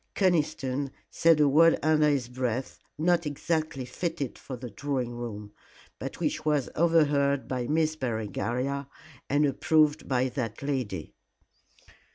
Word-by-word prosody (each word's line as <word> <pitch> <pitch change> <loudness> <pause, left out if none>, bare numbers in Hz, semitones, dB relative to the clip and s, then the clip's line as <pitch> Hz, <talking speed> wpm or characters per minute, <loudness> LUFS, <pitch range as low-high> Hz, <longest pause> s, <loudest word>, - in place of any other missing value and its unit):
Conniston 150 -7 +1 0.2
said 165 -2 +4
a 150 - +5
word 165 +4 +5
under 155 -1 +4
his 135 -5 0
breath 125 0 -3 0.2
not 170 +1 +2
exactly 155 -2 -2
fitted 145 +1 -3
for 130 - -8
the 120 -1 -8
drawing 130 +1 -2
room, 105 -4 -7 0.5
but - - -6
which - - -1
was 150 -4 +1
overheard 145 -4 +3
by 125 -2 -2
Miss 155 +1 +1
Berengaria 125 +2 -2 0.4
and 145 +2 +3
approved 150 +2 +2
by 130 -1 +1
that 120 -2 -4
lady. 125 - -3
140 Hz, 130 wpm, -28 LUFS, 125-155 Hz, 0.5 s, a